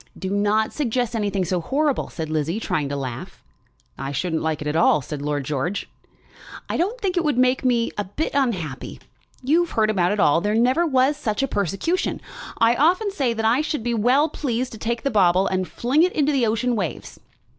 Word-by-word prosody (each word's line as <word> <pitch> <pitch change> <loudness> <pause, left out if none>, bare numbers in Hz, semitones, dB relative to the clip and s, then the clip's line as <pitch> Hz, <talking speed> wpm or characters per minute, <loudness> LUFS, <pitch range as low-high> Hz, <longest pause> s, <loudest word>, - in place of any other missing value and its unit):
"Do 190 0 -4
not 205 +2 +1
suggest 245 -4 -1
anything 200 -3 -1
so 180 0 -1
horrible," 285 - 0
said 160 -2 -5
Lizzie, 155 +5 -1
trying 150 -9 -2
to 140 - -3
laugh. 130 -4 -6 0.6
"I 135 +1 -4
shouldn't 160 +3 -1
like 160 -1 -1
it 150 - -5
at 150 - -1
all," 155 -3 +4
said 145 +2 -6
Lord 145 -1 -2
George. 150 +8 -2 0.8
"I - - -3
don't 410 +9 -1
think 380 -5 -1
it 350 - +2
would 295 -5 0
make 255 +1 +2
me 240 -2 +1
a 205 - -1
bit 245 +12 -3
unhappy. 185 - -2 0.4
You've 330 +6 +2
heard 215 -1 +1
about 180 -3 +1
it 210 - -1
all. 165 -1 +4
There 210 +2 0
never 255 +9 +3
was 270 0 +2
such 220 -4 -2
a - - +1
persecution. 205 - -1 0.4
I 230 +1 +4
often 360 - +2
say 270 -11 0
that 225 0 -2
I 235 +6 +3
should 300 -5 -3
be 240 0 -1
well 250 +7 +3
pleased 255 -5 -3
to 220 - -10
take 235 +1 -2
the 275 - 0
bauble 185 -2 +4
and 185 -1 -1
fling 260 +6 +1
it 365 +2 +3
into 295 -1 +2
the 260 -5 +2
ocean 235 +3 0
waves." 190 -7 -4
225 Hz, 210 wpm, -22 LUFS, 180-275 Hz, 0.8 s, all